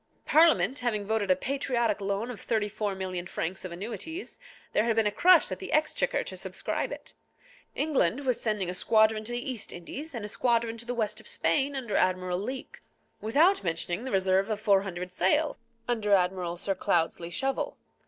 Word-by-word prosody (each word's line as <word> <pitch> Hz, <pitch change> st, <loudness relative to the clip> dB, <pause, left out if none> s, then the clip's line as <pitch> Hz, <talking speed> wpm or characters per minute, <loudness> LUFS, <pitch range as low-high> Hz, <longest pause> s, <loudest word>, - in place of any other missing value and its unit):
Parliament 285 Hz, -, +4 dB
having 215 Hz, -4 st, -1 dB
voted 215 Hz, -1 st, 0 dB
a 185 Hz, -, +6 dB
patriotic 240 Hz, -2 st, -1 dB
loan 200 Hz, +4 st, -2 dB
of 230 Hz, -, -9 dB
thirty 220 Hz, -3 st, 0 dB
four 210 Hz, -1 st, -3 dB
million 185 Hz, -2 st, -4 dB
francs 175 Hz, +3 st, -4 dB
of 185 Hz, -, -6 dB
annuities, 235 Hz, -, -6 dB, 0.3 s
there 210 Hz, -, +3 dB
had 230 Hz, -1 st, +1 dB
been 225 Hz, -1 st, +3 dB
a 210 Hz, -, +2 dB
crush 355 Hz, -, +5 dB
at -, -, -4 dB
the 380 Hz, -, -7 dB
Exchequer 310 Hz, +11 st, +1 dB
to -, -, -7 dB
subscribe -, -, -3 dB
it. -, -, -9 dB, 0.6 s
England 280 Hz, -, +1 dB
was 255 Hz, -4 st, 0 dB
sending 210 Hz, -5 st, 0 dB
a 180 Hz, -, -2 dB
squadron 215 Hz, +3 st, +3 dB
to 225 Hz, -, -3 dB
the 240 Hz, 0 st, -3 dB
East 235 Hz, -5 st, -5 dB
Indies, 270 Hz, -, -7 dB
and 220 Hz, -3 st, -4 dB
a -, -, -4 dB
squadron 230 Hz, +1 st, +1 dB
to 235 Hz, -, -6 dB
the 245 Hz, -, -2 dB
West 220 Hz, -3 st, -1 dB
of -, -, -12 dB
Spain 280 Hz, 0 st, +1 dB
under 245 Hz, -5 st, -3 dB
Admiral 185 Hz, -1 st, +1 dB
Leake, 255 Hz, +6 st, -6 dB, 0.4 s
without 305 Hz, -, +3 dB
mentioning 175 Hz, +3 st, -2 dB
the 260 Hz, -, -4 dB
reserve 190 Hz, +1 st, +2 dB
of 215 Hz, -1 st, -1 dB
four 200 Hz, -2 st, +4 dB
hundred 180 Hz, -2 st, -5 dB
sail, 295 Hz, -, +2 dB, 0.3 s
under 220 Hz, -4 st, +1 dB
Admiral 180 Hz, -2 st, 0 dB
Sir 195 Hz, +2 st, -1 dB
Cloudesley 170 Hz, -2 st, 0 dB
Shovel. 270 Hz, +9 st, -2 dB
215 Hz, 190 wpm, -28 LUFS, 190-250 Hz, 0.6 s, a